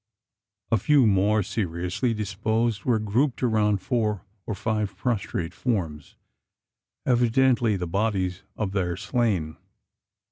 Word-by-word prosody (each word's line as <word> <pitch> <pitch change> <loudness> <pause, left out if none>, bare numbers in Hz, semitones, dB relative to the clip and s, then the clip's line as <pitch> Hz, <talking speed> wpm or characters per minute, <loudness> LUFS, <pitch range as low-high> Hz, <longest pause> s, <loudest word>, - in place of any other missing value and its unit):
A 115 - +4
few 140 +4 +4
more 105 +1 +3
seriously 90 +4 -2
disposed 105 +1 -1
were 120 -3 +3
grouped 115 +6 0
around 105 -4 +2
four 105 -7 -1 0.2
or 110 - -2
five 105 -1 -2
prostrate 95 -7 -2
forms 85 - -3 0.9
evidently 120 -2 +3
the 90 - -3
bodies 95 -1 -1 0.2
of 105 -3 -1
their 90 -3 -1
slain. 105 -8 -1
105 Hz, 110 wpm, -25 LUFS, 95-115 Hz, 0.9 s, A